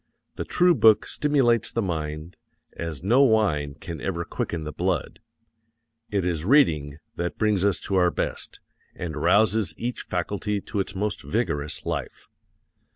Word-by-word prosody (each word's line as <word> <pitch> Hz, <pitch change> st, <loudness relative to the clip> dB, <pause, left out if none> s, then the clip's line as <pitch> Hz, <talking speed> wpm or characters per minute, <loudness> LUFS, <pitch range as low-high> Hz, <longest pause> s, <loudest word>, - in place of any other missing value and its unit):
The -, -, -4 dB
true 180 Hz, 0 st, +4 dB
book 110 Hz, -6 st, +5 dB
stimulates 135 Hz, -6 st, +2 dB
the 115 Hz, -, -1 dB
mind 80 Hz, -1 st, -4 dB, 0.4 s
as 85 Hz, -2 st, -6 dB
no 120 Hz, +8 st, +4 dB
wine 90 Hz, -, +2 dB
can 80 Hz, -1 st, -8 dB
ever 85 Hz, +3 st, -2 dB
quicken 85 Hz, -1 st, -3 dB
the 75 Hz, -, -5 dB
blood. 90 Hz, -1 st, -2 dB, 0.9 s
It 100 Hz, -3 st, -1 dB
is 85 Hz, -4 st, -1 dB
reading 80 Hz, -, +3 dB, 0.2 s
that 85 Hz, -3 st, -3 dB
brings 105 Hz, -3 st, +1 dB
us 100 Hz, -2 st, +2 dB
to 95 Hz, -, -1 dB
our 90 Hz, -1 st, +4 dB
best, -, -, -4 dB, 0.4 s
and 85 Hz, -3 st, -5 dB
rouses 105 Hz, -1 st, +2 dB
each 120 Hz, +1 st, -3 dB
faculty 100 Hz, +3 st, -2 dB
to 100 Hz, +1 st, -5 dB
its 95 Hz, +1 st, -3 dB
most 105 Hz, -1 st, -2 dB
vigorous 75 Hz, 0 st, -2 dB
life. -, -, -5 dB
95 Hz, 150 wpm, -25 LUFS, 80-110 Hz, 0.9 s, book